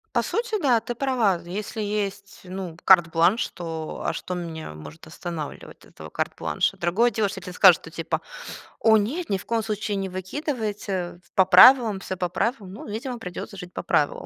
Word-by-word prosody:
По - - +3
сути, 465 -1 -2
да, 250 -5 +4
ты 240 +2 -6
права. 240 -8 +1
Если 205 +4 -5
есть 200 -1 -3
ну 185 -2 -6
карт-бланш, 175 +3 +4
то 165 -3 -6
а - - 0
что 180 - -5
меня 165 - -6
может 75 0 -11
останавливать 160 -1 -7
этого - - -12
карт-бланша? - - -1
Другое 200 +8 +2
дело, 215 -1 +1
если 195 -1 -7
тебе 180 0 -8
скажут, 180 -2 +6
что 160 - -11
типа: 165 0 -3 0.6
"О 220 -1 +5
нет, 275 - -2
ни 195 - +1
в 190 - -11
коем 230 -1 0
случае 210 -1 -2
не 195 0 -2
выкидывайте, 200 - -4 0.2
по 190 - +6
правилам, 230 0 +7
всё 190 -1 -5
по 180 -1 -2
правилам", 210 0 -2
ну 210 - -9
видимо, 240 +4 -5
придется 190 -1 -7
жить 180 -1 -9
по - - -5
правилам. 145 - 0
195 Hz, 180 wpm, -24 LUFS, 175-225 Hz, 0.6 s, правилам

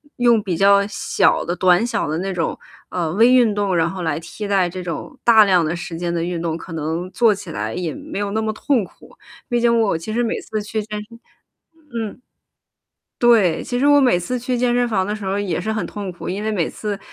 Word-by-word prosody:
用 240 -3 +3
比 185 -4 -2
较 200 +2 +5
小 - - +1
的 175 - -2
短 180 +4 +3
小 235 - -1
的 155 +1 -2
那 195 +1 -2
种， 165 -2 -2 0.3
呃， 170 -3 -2
微 230 +3 +6
运 245 -4 +5
动， 200 -3 0
然 165 - +2
后 185 -2 -5
来 160 -2 -1
替 205 +5 -7
代 190 -3 +2
这 185 +1 -6
种 180 - -6
大 225 -2 +8
量 180 -5 +3
的 165 +3 -1
时 170 -1 -6
间 170 0 -2
的 165 -1 -1
运 175 -1 -3
动， 165 -1 -2
可 170 +1 -9
能 165 +3 -3
做 215 +2 +3
起 200 - -9
来 105 +2 -3
也 170 -4 -3
没 - - -7
有 200 -1 -2
那 220 +1 0
么 220 0 -1
痛 240 -3 0
苦。 - - -19 0.3
毕 240 -1 +1
竟 235 -1 +3
我 200 -7 +1
其 215 +7 -6
实 240 +1 +1
每 230 - -1
次 215 -1 -4
去 215 +1 -3
健 210 0 -6
身 230 0 -14 0.7
嗯， 225 +1 -5 1.0
对， 225 -8 +4
其 245 - -3
实 280 - +2
我 290 0 +6
每 245 -10 +4
次 250 +8 -3
去 245 +1 -2
健 245 0 +1
身 245 0 +2
房 190 -4 0
的 210 - -2
时 210 -2 -7
候 195 +1 -1
也 185 -4 -2
是 220 - -3
很 220 -1 -1
痛 200 -3 -6
苦。 175 - -7
因 200 +3 -3
为 220 - -1
每 180 -6 0
次， 205 -2 -4
200 Hz, 260 characters per minute, -20 LUFS, 175-225 Hz, 1.0 s, 大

